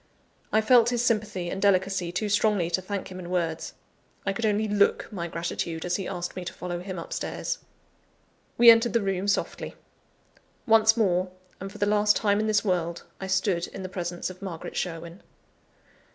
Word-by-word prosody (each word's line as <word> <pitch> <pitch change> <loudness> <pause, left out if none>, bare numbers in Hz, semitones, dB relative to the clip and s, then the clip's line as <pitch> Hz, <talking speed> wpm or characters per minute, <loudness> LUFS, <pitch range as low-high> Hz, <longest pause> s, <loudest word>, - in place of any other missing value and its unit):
I 220 - +4
felt 235 +1 +5
his 245 -1 0
sympathy 210 -6 0
and 190 - -4
delicacy 190 -2 +2
too 210 +4 -2
strongly 205 -4 +2
to 185 - +1
thank 195 0 -5
him 185 - -7
in 175 -1 -7
words; 165 -3 -2 0.5
I 195 - 0
could 220 +3 -1
only 215 +1 +1
look 205 -1 +2
my 175 -3 -3
gratitude 170 -1 -3
as 180 - 0
he 195 - -4
asked 175 0 -4
me 185 - -5
to 175 - -6
follow 175 -1 -5
him 185 +1 -6
up 170 - -6
stairs. - - -3 1.0
We 235 -1 +10
entered 230 +1 +3
the 230 -3 +2
room 195 0 -1
softly. 205 - -1 0.9
Once 220 0 +5
more, 185 -4 +2 0.3
and 195 +1 -6
for - - -11
the 205 - +1
last 210 0 +3
time 205 -1 +2
in 215 - 0
this 215 0 +2
world, 175 -3 -1 0.2
I 190 - -5
stood 190 -2 +1
in 190 - -8
the 185 - -5
presence 175 -1 -4
of 185 - -14
Margaret 180 -5 -6
Sherwin. 170 +1 -4
190 Hz, 190 wpm, -26 LUFS, 175-210 Hz, 1.0 s, We